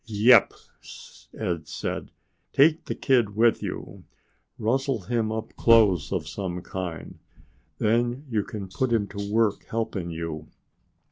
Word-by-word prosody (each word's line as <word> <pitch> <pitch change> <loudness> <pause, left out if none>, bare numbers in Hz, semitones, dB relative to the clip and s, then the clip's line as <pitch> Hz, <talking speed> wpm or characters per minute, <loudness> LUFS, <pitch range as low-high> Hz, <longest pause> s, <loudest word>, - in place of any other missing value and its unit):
"Yep!" 115 +3 +5 0.8
Ed 85 -3 -3
said. - - -4 0.4
"Take 155 +3 +4
the - - -3
kid 120 -7 +2
with 115 +1 +3
you. - - -6 0.5
Rustle 130 +1 0
him 110 +3 -1
up 110 0 -5
clothes 105 -9 +4
of 90 -6 -2
some 90 -1 -5
kind. 90 -3 -6 0.6
Then 120 +5 0
you 110 -5 0
can 105 -6 -7
put 120 +7 -2
him 110 -3 +2
to 100 0 -5
work 110 -2 +1
helping 110 -6 -3
you." 80 -2 -5
110 Hz, 130 wpm, -25 LUFS, 95-120 Hz, 0.8 s, Yep